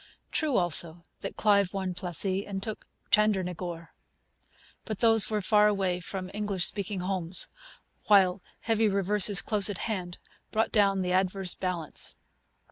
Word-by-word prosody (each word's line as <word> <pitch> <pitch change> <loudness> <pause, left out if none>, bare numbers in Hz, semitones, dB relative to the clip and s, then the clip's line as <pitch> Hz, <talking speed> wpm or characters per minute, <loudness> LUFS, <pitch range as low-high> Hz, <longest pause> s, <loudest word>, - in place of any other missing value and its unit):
True, 305 -5 0
also, 170 -1 +3 0.2
that - - -6
Clive 200 -3 +2
won 190 -2 -3
Plassey 185 +2 -1
and 195 -1 -5
took 220 -1 -6 0.2
Chandernagore. 180 -5 0 0.9
But 215 -3 -5
those 225 -3 +5
were 210 -2 -2
far 210 +2 +4
away 190 -3 0
from 185 +1 -6
English 205 -3 0
speaking 200 -2 -1
homes; 180 -2 -2 0.6
while 190 -2 +4 0.2
heavy 225 -1 +1
reverses 200 +1 +3
close 210 -2 +2
at 200 - -4
hand 185 -6 -4 0.3
brought 220 0 -1
down 195 -3 +2
the 180 - -2
adverse 185 0 +1
balance. 180 -4 -2
195 Hz, 135 wpm, -27 LUFS, 180-210 Hz, 0.9 s, those